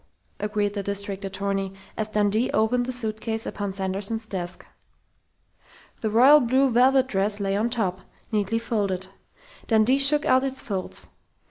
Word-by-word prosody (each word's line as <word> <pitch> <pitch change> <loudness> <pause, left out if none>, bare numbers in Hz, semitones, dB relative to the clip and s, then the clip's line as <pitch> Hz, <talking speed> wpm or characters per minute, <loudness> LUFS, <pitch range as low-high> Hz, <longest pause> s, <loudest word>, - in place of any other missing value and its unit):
agreed 210 0 -1
the 205 - -3
district 200 0 -3
attorney, 195 0 -2 0.2
as 215 - -2
Dundee 210 +2 +1
opened 245 +3 +1
the - - -2
suitcase 225 -2 -3
upon 205 -1 -4
Sanderson's 195 +3 -2
desk. 180 -4 -6 1.3
The 220 - -1
royal 260 +7 +7
blue 260 +1 +2
velvet 260 +2 +4
dress 205 -3 -1
lay 195 -1 -1
on 220 +4 0
top, 195 -6 -1 0.3
neatly 210 0 0
folded. 200 -5 -2 0.6
Dundee 225 +4 +3
shook 290 +2 +5
out 260 +1 +4
its 265 -1 -2
folds. 190 -4 -3
215 Hz, 140 wpm, -24 LUFS, 200-240 Hz, 1.3 s, royal